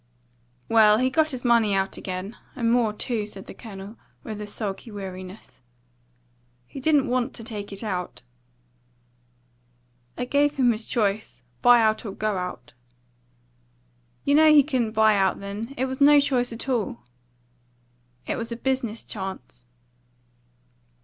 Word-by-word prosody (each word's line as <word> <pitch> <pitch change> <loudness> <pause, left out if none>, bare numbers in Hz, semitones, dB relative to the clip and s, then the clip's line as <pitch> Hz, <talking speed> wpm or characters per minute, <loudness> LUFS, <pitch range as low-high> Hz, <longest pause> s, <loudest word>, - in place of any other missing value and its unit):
"Well, 215 -2 +6
he 255 +2 +1
got 310 +3 +2
his 255 -3 -5
money 230 -4 +4
out 195 0 -1
again, 185 +4 -5 0.2
and 230 -2 +1
more, 235 -3 +3
too," 215 0 -3
said 195 -2 -11
the - - -10
Colonel, 200 -1 -10 0.3
with 215 -2 -6
a 210 - -6
sulky 210 +2 -5
weariness. 190 -3 -9 1.0
"He 270 - -9
didn't 290 0 +3
want 250 +1 -1
to 230 - -7
take 210 -3 -7
it 200 +3 -6
out." 180 - -4 1.9
"I 250 - -2
gave 285 +3 +2
him 255 -4 +4
his 220 0 -4
choice: 205 - -1 0.2
buy 245 -1 +7
out 220 0 +1
or 205 -4 -6
go 215 0 -1
out." 180 -6 -7 1.5
"You 285 - +3
know 310 +1 +7
he 295 -2 +7
couldn't 250 -6 -1
buy 220 -1 +4
out 190 -2 +1
then. 210 +6 -6
It 260 - +1
was 260 +1 -5
no 290 +1 +8
choice 255 -4 +1
at 230 +3 -6
all." 245 -1 -1 1.2
"It - - -2
was 230 +1 -5
a - - -2
business 245 -3 -2
chance." 190 - -7
225 Hz, 150 wpm, -25 LUFS, 200-255 Hz, 1.9 s, no